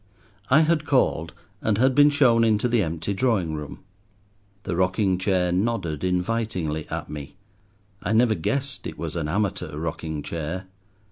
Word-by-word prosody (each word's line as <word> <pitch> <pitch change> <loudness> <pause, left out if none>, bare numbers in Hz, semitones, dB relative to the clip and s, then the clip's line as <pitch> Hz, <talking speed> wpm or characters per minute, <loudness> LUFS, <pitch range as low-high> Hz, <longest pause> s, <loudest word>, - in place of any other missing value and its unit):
I 140 +4 +6
had 160 0 +2
called, 85 - +2 0.3
and 110 -2 +1
had 130 +3 +4
been 145 +2 +6
shown 130 -6 +4
into 110 +1 +3
the 120 -2 +2
empty 85 +2 -2
drawing 100 -7 +1
room. 75 -1 -7 0.8
The 90 - -2
rocking 95 +1 +1
chair 95 -2 +1
nodded 90 -6 -1
invitingly 90 -4 -1
at - - -4
me. 75 -2 -8 0.7
I 95 - -2
never 115 0 +4
guessed 135 - -2
it 80 - -8
was 80 -1 -5
an 80 -3 -2
amateur 95 -3 -2
rocking 80 -1 -4
chair. 85 +5 -4
95 Hz, 150 wpm, -24 LUFS, 80-115 Hz, 0.8 s, I